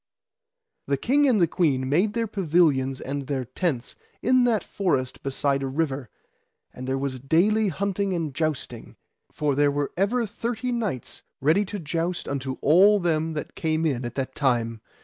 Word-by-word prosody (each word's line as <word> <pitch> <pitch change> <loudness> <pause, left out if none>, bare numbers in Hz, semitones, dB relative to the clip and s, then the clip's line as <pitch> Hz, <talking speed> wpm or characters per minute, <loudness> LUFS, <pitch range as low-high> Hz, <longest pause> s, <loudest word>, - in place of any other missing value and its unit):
The 140 - +1
king 285 - +3
and 240 -6 +3
the 175 - +5
queen 145 -6 +1
made 180 +10 +2
their 230 -1 0
pavilions 155 -10 +2
and 140 0 -4
their 135 -3 -2
tents 130 -1 -2 0.3
in 255 -1 +4
that 225 -4 +2
forest 130 -10 -1
beside 140 0 0
a 135 - -2
river, 135 -3 -2 0.6
and 130 +1 -7
there 135 0 0
was 135 -1 -3
daily 195 - +2
hunting 200 +2 -1
and 160 -5 -2
jousting, 155 -1 -3 0.4
for 150 -2 0
there 145 +1 +3
were 145 0 -1
ever 230 +6 +1
thirty 230 +3 -3
knights 210 - -3 0.2
ready 160 +9 +3
to 205 - -5
joust 170 +1 -2
unto 135 -1 -3
all 195 +7 +6
them 160 -2 0
that 150 - -5
came 160 0 -1
in 130 -5 0
at 120 - -5
that 135 -1 -3
time. 115 -5 0
155 Hz, 170 wpm, -25 LUFS, 135-200 Hz, 0.6 s, all